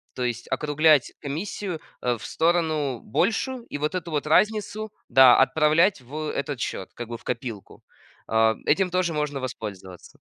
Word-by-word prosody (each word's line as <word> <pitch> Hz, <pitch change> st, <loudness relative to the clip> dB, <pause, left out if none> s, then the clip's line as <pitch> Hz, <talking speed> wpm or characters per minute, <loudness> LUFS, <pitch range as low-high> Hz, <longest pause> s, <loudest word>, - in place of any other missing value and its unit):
то 125 Hz, -, -3 dB
есть 120 Hz, -2 st, -3 dB
округлять 150 Hz, +1 st, +3 dB
комиссию, 165 Hz, +4 st, -4 dB, 0.2 s
э, 120 Hz, -1 st, 0 dB
в 110 Hz, -, -10 dB
сторону 160 Hz, -6 st, 0 dB
большую, 225 Hz, -, -1 dB
и -, -, -1 dB
вот 150 Hz, +4 st, -2 dB
эту 175 Hz, -2 st, -4 dB
вот 150 Hz, 0 st, -2 dB
разницу, 215 Hz, +4 st, +1 dB, 0.2 s
да, 130 Hz, 0 st, +8 dB
отправлять 155 Hz, +5 st, +3 dB
в 125 Hz, +4 st, -12 dB, 0.2 s
этот 140 Hz, -1 st, -3 dB
счет, 95 Hz, -4 st, -4 dB
как 120 Hz, -, -7 dB
бы 115 Hz, 0 st, -6 dB
в -, -, -22 dB
копилку. 120 Hz, -4 st, -6 dB, 0.5 s
А, 110 Hz, 0 st, +3 dB
этим 185 Hz, +4 st, +2 dB
тоже 180 Hz, -2 st, 0 dB
можно 150 Hz, -2 st, -2 dB
воспользоваться. 100 Hz, -8 st, -8 dB
145 Hz, 155 wpm, -25 LUFS, 120-170 Hz, 0.5 s, да